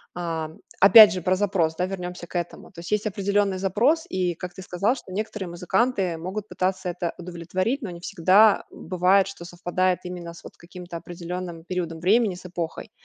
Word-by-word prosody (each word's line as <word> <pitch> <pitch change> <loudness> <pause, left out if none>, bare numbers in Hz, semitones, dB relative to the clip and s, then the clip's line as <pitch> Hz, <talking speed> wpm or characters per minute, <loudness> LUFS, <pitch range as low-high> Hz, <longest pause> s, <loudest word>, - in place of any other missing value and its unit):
А, 165 -3 -3 0.3
опять 210 +2 +10
же, 185 -3 -4
про 185 +1 +2
запрос, 185 -5 0
да, 180 +2 0
вернёмся 180 -2 -6
к - - -15
этому. 175 0 -6
То 170 - -13
есть 175 - -8
есть 210 +1 +1
определённый 200 -1 0
запрос, 235 - +2
и, 180 -2 -1
как 180 +1 -7
ты 190 - -10
сказал, 195 +6 0
что 190 - -11
некоторые 205 -2 -4
музыканты 180 +1 0
могут 195 +5 -5
пытаться 185 0 -2
это 175 -1 -3
удовлетворить, 180 - -3
но 215 - -5
не 170 -1 -8
всегда 200 +4 +4
бывает, 185 +2 +2
что 195 -3 -9
совпадает 180 +1 -1
именно 175 -2 -7
с - - -14
вот - - -12
каким-то 175 0 -9
определённым 175 0 -7
периодом 170 -2 -4
времени, 200 +2 +3
с 180 - -13
эпохой. 175 -2 -5
185 Hz, 185 wpm, -24 LUFS, 175-195 Hz, 0.3 s, опять